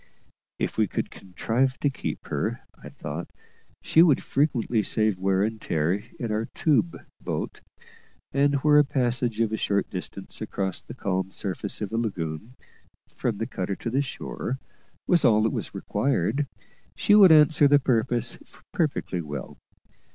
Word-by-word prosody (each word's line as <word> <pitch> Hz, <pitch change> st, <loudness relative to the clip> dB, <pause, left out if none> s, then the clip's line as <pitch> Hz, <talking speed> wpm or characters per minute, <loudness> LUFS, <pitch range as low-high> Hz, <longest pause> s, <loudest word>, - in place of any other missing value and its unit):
If -, -, -2 dB
we 110 Hz, -, +4 dB
could -, -, -3 dB
contrive 120 Hz, +7 st, -1 dB
to 145 Hz, -, +3 dB
keep -, -, -5 dB
her, -, -, -2 dB
I -, -, -11 dB
thought, 75 Hz, +3 st, -6 dB, 0.5 s
she 160 Hz, -, +5 dB
would 160 Hz, -6 st, +5 dB
frequently 125 Hz, -5 st, +1 dB
save 110 Hz, -2 st, +1 dB
wear 95 Hz, 0 st, +2 dB
and 110 Hz, +1 st, -2 dB
tear 85 Hz, +6 st, 0 dB, 0.2 s
in 120 Hz, -5 st, -3 dB
our 110 Hz, +1 st, -1 dB
tube 125 Hz, -, +1 dB, 0.2 s
boat; -, -, -4 dB, 0.7 s
and 140 Hz, +1 st, +3 dB
where 150 Hz, -1 st, +6 dB
a -, -, +7 dB
passage 125 Hz, -4 st, 0 dB
of 110 Hz, -1 st, +1 dB
a -, -, 0 dB
short 100 Hz, -2 st, 0 dB
distance -, -, -6 dB
across 95 Hz, -2 st, -2 dB
the -, -, -10 dB
calm 95 Hz, -1 st, -1 dB
surface 100 Hz, +1 st, -3 dB
of 105 Hz, -, -3 dB
a -, -, 0 dB
lagoon, 100 Hz, 0 st, -3 dB, 0.5 s
from 115 Hz, -4 st, -3 dB
the 115 Hz, -, -2 dB
cutter 100 Hz, -5 st, -3 dB
to 115 Hz, -, -5 dB
the 135 Hz, +3 st, +2 dB
shore, 135 Hz, -1 st, -4 dB, 0.5 s
was 175 Hz, -3 st, +3 dB
all 110 Hz, -2 st, +5 dB
that 110 Hz, -, +2 dB
was -, -, -4 dB
required, 135 Hz, -, 0 dB, 0.5 s
she -, -, +3 dB
would 200 Hz, -4 st, +9 dB
answer 150 Hz, -1 st, +6 dB
the 145 Hz, +1 st, +6 dB
purpose 120 Hz, -2 st, 0 dB, 0.3 s
perfectly 150 Hz, -, -1 dB
well. 75 Hz, -3 st, -7 dB
115 Hz, 160 wpm, -26 LUFS, 100-140 Hz, 0.7 s, would